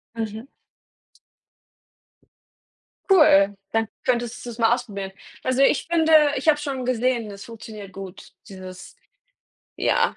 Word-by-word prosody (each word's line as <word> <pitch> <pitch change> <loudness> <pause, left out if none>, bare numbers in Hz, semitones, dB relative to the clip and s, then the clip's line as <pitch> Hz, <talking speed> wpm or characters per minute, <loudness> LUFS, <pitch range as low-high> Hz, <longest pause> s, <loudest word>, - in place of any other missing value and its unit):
Mhm. 220 +2 -5 2.6
Cool. 205 - +6 0.2
Dann 225 -1 +1 0.2
könntest 245 -1 -1
du's 240 -1 -7
mal 230 0 +4
ausprobieren. 200 -6 -5 0.3
Also, 255 +1 +1
ich 275 +2 +3
finde 320 -1 +2 0.2
ich 270 - -4
habe 305 - +7
es 295 - -8
schon 265 -4 -3
gesehen, 245 -2 0
das 200 0 -10
funktioniert 215 -4 -10
gut, 190 0 -10 0.2
dieses, 185 -1 -10 0.8
ja. - - +1
230 Hz, 120 wpm, -23 LUFS, 200-255 Hz, 2.6 s, habe